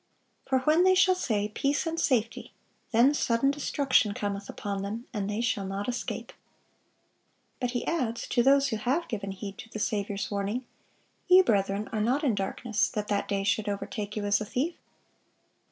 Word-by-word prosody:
For 265 -1 +2
when 310 +6 +4
they 375 0 +5
shall 370 0 +5
say, 215 - -1
Peace 280 +8 0
and 330 0 -2
safety; 230 -7 0 0.4
then 245 +5 +5
sudden 265 -1 +2
destruction 275 -6 +1
cometh 200 -3 -3
upon 200 -1 -4
them,... 215 +5 -5
and 205 -3 -2
they 210 +2 -1
shall 205 -5 -1
not 195 +1 -4
escape." 250 0 -4 1.3
But 250 -1 -2
He - - -4
adds, 245 -9 -1
to 240 - +3
those 275 +2 +4
who 220 - -1
have 275 +10 0
given 200 -4 -4
heed 195 +1 -7
to 225 - -9
the 220 - -7
Saviour's 205 -1 -2
warning, 205 +5 -2 0.6
"Ye, 370 +1 +8
brethren, 200 - +1
are 215 - -1
not 255 +7 +1
in 265 -6 +3
darkness, 205 +3 -1
that 210 -1 -4
that 200 -1 0
day 200 -1 -1
should 205 +2 0
overtake 205 +1 -4
you 210 -1 -2
as 205 +1 +2
a - - -2
thief. 275 +11 -1
225 Hz, 180 wpm, -28 LUFS, 205-270 Hz, 1.3 s, Ye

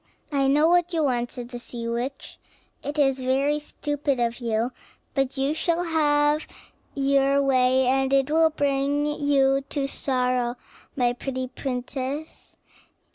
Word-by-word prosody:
"I 275 -2 +2
know 295 +3 +4
what 350 0 +3
you 320 -2 +1
want," 245 -3 0
said 245 -1 -7
the 245 -1 -7
sea 235 -1 -7
witch; 245 +4 -4 0.4
"it 290 +1 -5
is 270 -2 +2
very 270 +3 +1
stupid 290 -2 -2
of 235 0 -1
you, 230 0 -1 0.4
but 270 0 -1
you 270 +2 +1
shall 340 +2 0
have 300 -2 +2 0.5
your 275 0 +3
way, 260 -1 +3
and 265 +1 +2
it 275 +1 +2
will 320 +1 +5
bring 285 -1 0
you 280 -2 +2
to 280 -2 -1
sorrow, 250 -3 0 0.4
my 245 -2 +2
pretty 260 +1 -4
princess. 265 +3 -5
275 Hz, 140 wpm, -25 LUFS, 255-290 Hz, 0.5 s, will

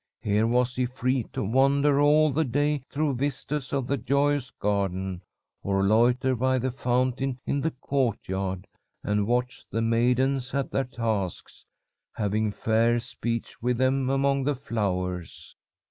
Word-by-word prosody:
Here 105 +2 +2
was 125 +1 +1
he 125 -1 0
free 125 -1 -1
to - - -3
wander 140 +5 +3
all 150 +1 +5
the 155 +4 +1
day 145 +2 +1
through 150 -1 0
vistas 140 +1 -3
of 135 -2 -1
the 140 +2 0
joyous 140 +1 +1
garden, 95 -3 -2 0.4
or 95 0 0
loiter 120 +5 +3
by 130 +2 +1
the 130 +1 -1
fountain 130 +1 0
in 140 - 0
the 160 - +1
courtyard 100 - -2 0.4
and 105 0 0
watch 125 +1 -1
the 115 - -1
maidens 125 +3 +1
at 140 -1 -1
their 135 - 0
tasks, 110 -7 -4 0.5
having 105 0 0
fair 115 +3 +2
speech 115 -1 -5
with 125 0 0
them 130 +1 +1
among 135 0 +2
the 145 +1 0
flowers. 90 -8 -3
125 Hz, 145 wpm, -26 LUFS, 110-135 Hz, 0.5 s, all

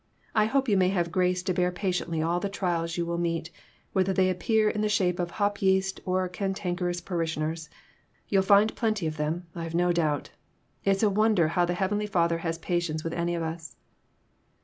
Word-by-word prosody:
I 215 -2 +4
hope 270 +4 +1
you 205 -3 +3
may 185 -1 +4
have 175 -3 0
grace 180 0 +1
to 185 0 0
bear 180 0 +1
patiently 180 -3 -1
all 170 +2 +1
the 200 - -2
trials 170 -4 -2
you 170 - 0
will 170 0 -2
meet, 165 -1 -2 0.4
whether 190 -1 +2
they 185 -1 +3
appear 215 +4 +2
in 210 0 0
the 215 - +1
shape 185 -4 +1
of 175 -1 -1
hop 205 -1 0
yeast 190 0 +2
or 185 0 +1
cantankerous 180 -1 -2
parishioners. 160 -2 -3 0.6
You'll 195 -1 +3
find 200 +3 +4
plenty 215 -6 0
of 155 -1 -3
them, 155 +4 -2
I've 165 -1 -5
no 175 +1 +3
doubt. 155 -4 0 0.5
It's 195 +1 +2
a 210 - +5
wonder 210 -5 +3
how 175 +1 +2
the 175 0 -1
heavenly 205 +3 0
Father 170 -4 +1
has 165 -1 -2
patience 170 -2 -2
with 165 - -3
any 175 0 -1
of 170 - -2
us." 160 0 -6
180 Hz, 195 wpm, -27 LUFS, 170-195 Hz, 0.6 s, a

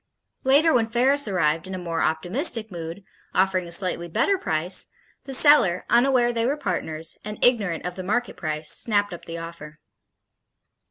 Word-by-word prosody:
Later 290 +5 +4
when 230 -3 +2
Ferris 260 +4 +1
arrived 165 -4 0
in 190 - -6
a - - -5
more 170 -2 -3
optimistic 215 - -1
mood, 170 +2 -7 0.3
offering 185 -1 +1
a - - -11
slightly 175 -1 0
better 395 - +1
price, 175 - +3 0.4
the 275 - -8
seller, 260 - +4
unaware 240 0 +3
they 230 0 0
were 285 +3 -1
partners, 165 - -4
and 210 0 -6
ignorant 205 -9 +1
of 180 - -3
the 185 - -6
market 240 +6 -2
price, 155 -1 -2
snapped 205 -4 +2
up 175 - -10
the 165 0 -7
offer. 165 -2 -10
190 Hz, 165 wpm, -23 LUFS, 170-240 Hz, 0.4 s, Later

